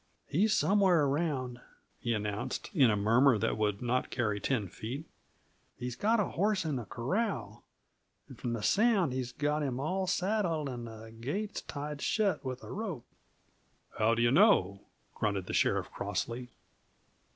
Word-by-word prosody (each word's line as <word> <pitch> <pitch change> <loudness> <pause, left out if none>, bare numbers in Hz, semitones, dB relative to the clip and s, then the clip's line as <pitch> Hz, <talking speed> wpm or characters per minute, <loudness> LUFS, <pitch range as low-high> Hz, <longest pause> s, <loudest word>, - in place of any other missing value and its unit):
"He's 210 +8 +2
somewheres 190 -5 +4
around," 135 -5 -1 0.4
he 120 -1 0
announced, 105 0 -3
in 140 - +5
a 105 - +3
murmur 115 +5 +4
that - - 0
would 105 0 -1
not 125 +1 0
carry 105 -5 -1
ten 110 -3 0
feet. 115 - -6 0.7
"He's 125 -1 -4
got 220 - +2
a 205 - +1
horse 200 -1 +1
in 155 -3 -1
the 120 - -5
corral, 120 - -2 0.6
and, - - -11
from 120 - -3
the 115 -3 -3
sound, 205 - +3
he's 130 -1 -3
got 150 +3 0
him 130 -3 -2
all 185 +7 -1
saddled; 180 -6 0
and 120 -2 -6
the 110 0 -10
gate's 200 - -3
tied 145 0 -6
shut 200 -6 +1
with 130 -1 -5
a - - -8
rope." 195 - -4 0.9
"How 115 +2 +4
d'yuh 120 0 +3
know?" 130 - +4 0.3
grunted 100 -3 -1
the - - -5
sheriff - - +1
crossly. 120 +1 -3
130 Hz, 155 wpm, -31 LUFS, 115-185 Hz, 0.9 s, in